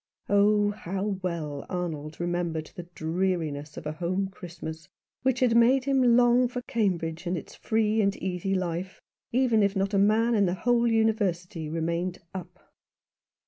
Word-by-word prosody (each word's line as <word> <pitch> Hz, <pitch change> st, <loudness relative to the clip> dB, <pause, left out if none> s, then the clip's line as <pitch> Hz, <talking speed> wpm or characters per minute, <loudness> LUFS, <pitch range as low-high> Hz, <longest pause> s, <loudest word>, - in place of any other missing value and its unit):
Oh, 205 Hz, 0 st, +4 dB
how 195 Hz, 0 st, -3 dB
well 155 Hz, -6 st, -3 dB
Arnold 155 Hz, -4 st, -4 dB
remembered 175 Hz, -2 st, -2 dB
the 175 Hz, -1 st, -8 dB
dreariness 160 Hz, -3 st, -2 dB
of -, -, -7 dB
a 150 Hz, -, -2 dB
home 180 Hz, +4 st, -2 dB
Christmas, 165 Hz, -4 st, -8 dB, 0.3 s
which 260 Hz, -1 st, +1 dB
had 240 Hz, -2 st, +4 dB
made 250 Hz, +3 st, +5 dB
him 260 Hz, -4 st, +4 dB
long 245 Hz, +1 st, +5 dB
for 250 Hz, 0 st, -5 dB
Cambridge 175 Hz, -7 st, -1 dB
and 175 Hz, +1 st, 0 dB
its -, -, -8 dB
free 220 Hz, 0 st, +1 dB
and 200 Hz, -1 st, +1 dB
easy 190 Hz, +1 st, -2 dB
life, 180 Hz, 0 st, -3 dB, 0.3 s
even 240 Hz, -3 st, +3 dB
if 200 Hz, 0 st, +2 dB
not 195 Hz, +1 st, 0 dB
a 200 Hz, -, +3 dB
man 220 Hz, +4 st, +3 dB
in 205 Hz, -4 st, +3 dB
the 175 Hz, -, 0 dB
whole 240 Hz, +4 st, +2 dB
University 195 Hz, -8 st, 0 dB
remained 170 Hz, +3 st, -2 dB
" -, -, -48 dB
up." 185 Hz, -3 st, -10 dB
190 Hz, 160 wpm, -27 LUFS, 170-220 Hz, 0.3 s, made